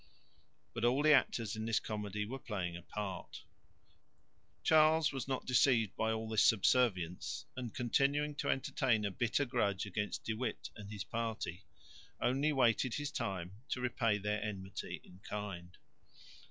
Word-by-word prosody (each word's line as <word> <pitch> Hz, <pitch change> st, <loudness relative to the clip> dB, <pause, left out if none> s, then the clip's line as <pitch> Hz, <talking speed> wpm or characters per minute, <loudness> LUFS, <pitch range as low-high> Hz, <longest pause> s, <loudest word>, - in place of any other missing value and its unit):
But 115 Hz, -, -4 dB
all 125 Hz, +4 st, +3 dB
the 155 Hz, 0 st, +7 dB
actors 115 Hz, -6 st, +2 dB
in 110 Hz, 0 st, -4 dB
this 115 Hz, -1 st, +2 dB
comedy 105 Hz, -1 st, -3 dB
were 130 Hz, +5 st, -5 dB
playing 95 Hz, -8 st, -3 dB
a 85 Hz, -, -7 dB
part. 95 Hz, 0 st, -6 dB, 1.2 s
Charles 155 Hz, -, +5 dB
was 135 Hz, -1 st, -3 dB
not 130 Hz, -1 st, -2 dB
deceived 120 Hz, -4 st, +3 dB
by 110 Hz, 0 st, +1 dB
all 110 Hz, 0 st, -2 dB
this 110 Hz, -2 st, +3 dB
subservience, 100 Hz, -5 st, +2 dB
and, 125 Hz, -3 st, -4 dB
continuing 140 Hz, +6 st, +1 dB
to -, -, -1 dB
entertain 125 Hz, -4 st, +1 dB
a 100 Hz, -, -1 dB
bitter 120 Hz, +8 st, +1 dB
grudge 105 Hz, -6 st, 0 dB
against 105 Hz, +1 st, -3 dB
De 115 Hz, -, -1 dB
Witt 120 Hz, +2 st, -4 dB
and 105 Hz, -1 st, -9 dB
his 105 Hz, -2 st, -5 dB
party, 110 Hz, -5 st, -4 dB, 0.5 s
only 135 Hz, +5 st, +2 dB
waited 125 Hz, -2 st, +3 dB
his 145 Hz, 0 st, -3 dB
time 95 Hz, -, -3 dB, 0.2 s
to 130 Hz, -, -1 dB
repay 120 Hz, -3 st, +1 dB
their 105 Hz, +1 st, -1 dB
enmity 95 Hz, -3 st, -5 dB
in 90 Hz, -, -16 dB
kind. 95 Hz, -4 st, -6 dB
110 Hz, 155 wpm, -35 LUFS, 100-130 Hz, 1.2 s, the